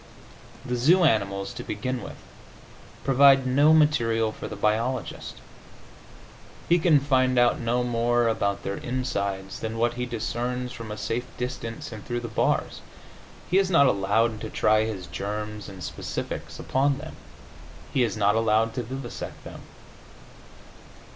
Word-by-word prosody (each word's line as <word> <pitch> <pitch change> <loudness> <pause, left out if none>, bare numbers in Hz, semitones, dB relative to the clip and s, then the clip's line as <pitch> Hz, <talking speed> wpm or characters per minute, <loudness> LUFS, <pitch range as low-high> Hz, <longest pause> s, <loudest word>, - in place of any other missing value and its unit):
The 125 -2 -2
zoo 165 +10 +4
animals, 100 -8 +1
to - - -7
begin 125 +4 -3
with, - - -8 0.9
provide 135 0 +6
no 140 +4 +4
material 120 -8 +3
for - - -7
the 105 - -6
biologist; 110 +5 -1 1.3
he 175 +1 +4
can 160 -3 +5
find 130 -2 +2
out 120 0 +4
no 120 +1 0
more 120 0 +1
about 100 -3 0
their 100 0 -3
insides 100 -6 -3
than 110 0 -4
what 120 +1 +1
he 125 0 -3
discerns 120 +2 -3
from 115 -3 -8
a 105 - -5
safe 120 +4 -3
distance 125 -2 -5
and 110 -2 -8
through 120 -1 -3
the 120 - -5
bars. 110 - 0 0.7
He 190 - +5
is 195 -1 +1
not 165 -6 +5
allowed 110 0 +1
to 110 - -5
try 110 0 +3
his 100 -5 -5
germs 105 +4 -5
and 95 -2 -9
specifics - - -5
upon 135 +1 +1
them; 155 +3 -9 0.8
he 130 - +2
is 115 -2 0
not 105 -1 +3
allowed 115 0 +2
to 125 - -2
vivisect 125 +1 -7
them. - - -10
120 Hz, 150 wpm, -26 LUFS, 110-130 Hz, 1.3 s, provide